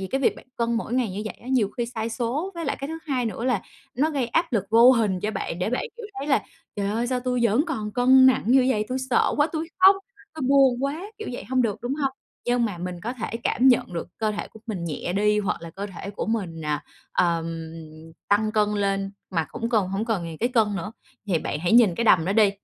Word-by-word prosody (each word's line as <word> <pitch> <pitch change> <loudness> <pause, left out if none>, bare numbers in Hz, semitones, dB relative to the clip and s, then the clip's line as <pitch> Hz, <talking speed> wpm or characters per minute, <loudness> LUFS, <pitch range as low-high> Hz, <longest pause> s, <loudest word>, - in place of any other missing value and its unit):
vì 190 - -3
cái 270 +7 -1
việc 270 - +2
bạn - - -14
cân 235 0 0
mỗi 230 +1 -2
ngày 250 -5 +1
như 195 +3 -4
vậy 215 - -5
á, - - -15
nhiều 250 -6 +2
khi 240 -1 -1
sai 230 -2 -4
số 250 +10 -2
với 335 -1 -4
lại - - -1
cái 275 - -4
thứ 325 +1 -5
hai 260 -4 0
nữa 225 +2 -4
là 250 -7 +1 0.3
nó 295 +6 +1
gây 275 -5 -1
áp 330 +7 0
lực 210 -5 +1
vô 230 +3 +8
hình 210 -7 +1
cho 210 - -1
bạn 175 -5 -4
để 180 +4 -1
bạn, 250 - -1
kiểu, 465 -3 -7
thấy 280 - -4
là 275 -8 +3 0.3
"Trời 200 -1 -1
ơi, 230 +3 -1
sao 250 0 -1
tui 250 0 -1
vẫn 230 +6 +3
còn 215 -10 -3
cân 260 +2 +6
nặng 260 - +4
như 255 +2 +5
vậy? 215 -4 +1
Tui 255 - -1
sợ 240 - +3
quá, 295 - +4
tui 320 0 -3
khóc, 380 +1 +8 0.4
tôi 315 - -6
buồn 270 -2 +4
quá!", 310 +8 -3
kiểu 435 - -5
vậy 245 - -6
hông 255 -1 +1
được, 210 -4 0
đúng 245 +3 -1
hông? 275 -2 -1 0.3
Nhưng 245 0 +2
mà 205 -6 -3
mình 180 0 -5
có 235 +6 -3
thể 230 -2 -4
cảm 260 +2 +3
nhận 245 -7 +3
được 170 -1 -4
cơ 220 -1 +1
thể 210 - -5
của 220 - -15
mình 195 -7 -4
nhẹ 170 +2 -3
đi 210 +2 +2
hoặc 200 -4 -2
là 170 - -7
cơ 195 +4 -5
thể 195 0 -7
của 205 - -4
mình, 185 -8 -2
à, 150 -1 -2 0.3
ờm, 165 -2 0 0.6
tăng 215 +1 +2
cân 210 -1 +2
lên 195 -1 -1 0.2
mà 165 -4 0
hổng 230 - -3
cần 215 -6 +1
hổng 195 +3 -2
cần 220 -7 -1
nhìn 165 -1 -6
cái 240 - +1
cân 220 -5 +2
nữa, 195 +3 -5 0.3
thì 180 -5 +1
bạn 150 - -3
hãy 175 +5 0
nhìn 230 -6 +6
cái 230 - -1
đầm 180 -7 +5
đó 190 - 0
đi. 210 -1 +5
225 Hz, 265 wpm, -24 LUFS, 195-255 Hz, 0.6 s, vô